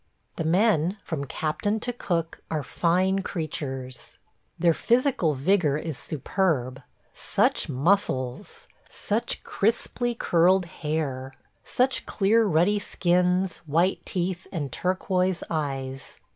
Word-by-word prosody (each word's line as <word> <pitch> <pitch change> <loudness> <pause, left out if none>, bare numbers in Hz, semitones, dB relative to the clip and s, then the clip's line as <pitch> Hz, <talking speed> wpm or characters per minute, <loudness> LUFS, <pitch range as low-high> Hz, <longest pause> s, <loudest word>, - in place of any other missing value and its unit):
The - - -1
men, 180 +1 +2
from 150 -5 -3
captain 165 +10 -1
to 245 - -1
cook, 170 -7 -2
are 155 -2 -1
fine 185 +6 +1
creatures. 135 -8 -5 0.4
Their 170 -1 +4
physical 235 - +2
vigor 150 0 +2
is 155 -1 -4
superb 140 -4 -1 0.2
– - - -39
such - - +1
muscles! 135 -4 0 0.2
such 230 +3 -2
crisply 235 +3 0
curled 180 -2 +3
hair! 150 -6 -3 0.3
such 255 +1 0
clear 220 +2 +3
ruddy 185 +4 +3
skins, 180 -1 +1
white 170 +6 +1
teeth, 180 0 -2
and 145 -7 -3
turquoise 185 +1 0
eyes. 135 -4 -4
175 Hz, 110 wpm, -26 LUFS, 150-195 Hz, 0.4 s, Their